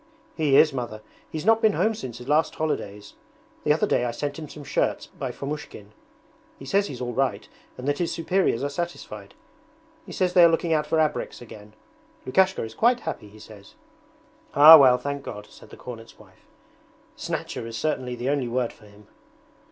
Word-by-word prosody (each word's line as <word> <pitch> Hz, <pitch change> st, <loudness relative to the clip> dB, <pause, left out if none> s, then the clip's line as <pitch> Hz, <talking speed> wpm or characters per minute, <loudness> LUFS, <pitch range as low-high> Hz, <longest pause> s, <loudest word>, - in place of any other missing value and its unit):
'He 145 Hz, -4 st, +3 dB
is. 150 Hz, -1 st, +5 dB
Mother. 120 Hz, -4 st, -5 dB, 0.3 s
He's 155 Hz, +2 st, -5 dB
not 225 Hz, 0 st, +4 dB
been 215 Hz, -2 st, +4 dB
home 220 Hz, +3 st, +1 dB
since 125 Hz, -, -8 dB
last 150 Hz, +5 st, +1 dB
holidays. 105 Hz, -10 st, -4 dB, 0.5 s
The -, -, +2 dB
other -, -, +2 dB
day -, -, +1 dB
I 120 Hz, -, -1 dB
sent 145 Hz, +5 st, -4 dB
him 155 Hz, -2 st, -8 dB
some 150 Hz, -, -10 dB
shirts -, -, -1 dB
by -, -, -6 dB
Fomushkin. 140 Hz, -8 st, -7 dB, 0.7 s
He 135 Hz, -, -11 dB
says 200 Hz, +8 st, +1 dB
he's 130 Hz, -2 st, -8 dB
all 120 Hz, -1 st, -3 dB
right, 135 Hz, +1 st, -1 dB, 0.3 s
and 125 Hz, -, -7 dB
that 145 Hz, 0 st, 0 dB
his 175 Hz, -, -1 dB
superiors 170 Hz, -7 st, 0 dB
are 140 Hz, -, -1 dB
satisfied. 140 Hz, -, -6 dB, 0.7 s
He -, -, -12 dB
says 180 Hz, -1 st, 0 dB
they 180 Hz, -, +7 dB
are 170 Hz, -, +8 dB
looking 165 Hz, 0 st, 0 dB
out 150 Hz, -1 st, 0 dB
for 160 Hz, -, 0 dB
abreks 155 Hz, -1 st, -1 dB
again. 105 Hz, -3 st, -13 dB, 0.5 s
Lukashka 190 Hz, +8 st, +2 dB
is 110 Hz, 0 st, -7 dB
quite 240 Hz, -, +2 dB
happy, 105 Hz, -, -6 dB
he 105 Hz, -, -16 dB
says.' 105 Hz, -2 st, -15 dB, 0.8 s
'Ah 150 Hz, +3 st, +11 dB
well, 130 Hz, -2 st, +6 dB
thank 140 Hz, +1 st, -4 dB
God,' 105 Hz, -6 st, -8 dB
said -, -, -16 dB
the -, -, -13 dB
cornet's 115 Hz, -2 st, -10 dB
wife.' -, -, -21 dB, 0.7 s
"Snatcher" 115 Hz, -, -5 dB
is 115 Hz, -1 st, -6 dB
certainly 125 Hz, -1 st, -2 dB
the 120 Hz, +2 st, -3 dB
only 140 Hz, -3 st, 0 dB
word 120 Hz, 0 st, -2 dB
for 105 Hz, -, -19 dB
him.' 105 Hz, +1 st, -18 dB
140 Hz, 190 wpm, -24 LUFS, 115-160 Hz, 0.8 s, Ah